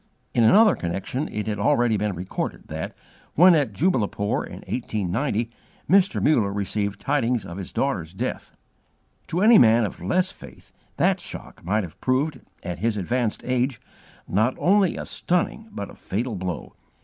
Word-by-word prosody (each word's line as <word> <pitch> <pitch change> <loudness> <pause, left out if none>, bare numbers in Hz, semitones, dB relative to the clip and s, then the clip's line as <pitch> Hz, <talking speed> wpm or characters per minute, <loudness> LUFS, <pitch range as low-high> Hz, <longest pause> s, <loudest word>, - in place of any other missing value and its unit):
In 120 - +3
another 210 - +6
connection 95 - -3
it 105 - -4
has 105 -2 -3
already 120 0 +3
been 105 0 -1
recorded 90 +2 -5
that, - - -5 0.4
when 180 +3 +8
at 145 -8 +2
Jubbulpore 105 - 0
in - - -9
1890, 115 +1 -2 0.4
Mr. 195 +3 +4
Muller 115 -10 +3
received 100 0 -2
tidings 125 -5 0
of 85 - -8
his 95 - -6
daughter's 95 - -1
death. 95 - -4 0.8
To 175 - -1
any 220 +2 +8
man 115 -1 +5
of 100 - -7
less 180 - +1
faith 65 -3 -14 0.3
that - - +3
shock - - -8
might 105 +5 0
have 85 -4 -10
proved, 130 +2 0 0.2
at 90 -2 -5
his 110 +1 0
advanced 115 +3 -1
age, 125 0 0 0.5
not 110 +7 +1
only 195 0 +3
a - - -5
stunning 180 +5 -1
but 100 - -6
a - - -14
fatal 115 +5 -3
blow. 90 -3 -5
115 Hz, 160 wpm, -24 LUFS, 100-145 Hz, 0.8 s, when